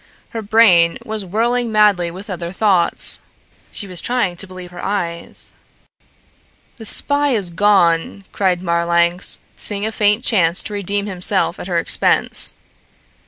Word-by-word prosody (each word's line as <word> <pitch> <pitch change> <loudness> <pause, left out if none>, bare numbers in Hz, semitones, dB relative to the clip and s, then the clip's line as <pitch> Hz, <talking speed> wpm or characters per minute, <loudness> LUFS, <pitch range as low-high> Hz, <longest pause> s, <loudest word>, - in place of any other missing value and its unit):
Her 225 - -5
brain 200 -6 +4
was 215 -1 -4
whirling 230 +5 0
madly 205 -5 +3
with 190 +5 -10
other 175 -3 -5
thoughts. 190 -2 +2 0.5
She 205 - -4
was 180 -3 -4
trying 240 -8 0
to 190 - -4
believe 185 -1 -10
her 175 - -9
eyes. 170 -4 -2 1.2
"The 225 - -9
spy 285 +3 +1
is 190 -5 -2
gone," 175 -1 +2
cried 185 -2 0
Marlanx, 170 +1 +1 0.2
seeing 205 0 -2
a 220 - -1
faint 210 +1 +2
chance 180 -6 +2
to 210 - -6
redeem 200 0 -1
himself 185 -2 -1
at - - -6
her 175 -2 -1
expense. 165 - +1
195 Hz, 140 wpm, -18 LUFS, 175-210 Hz, 1.2 s, brain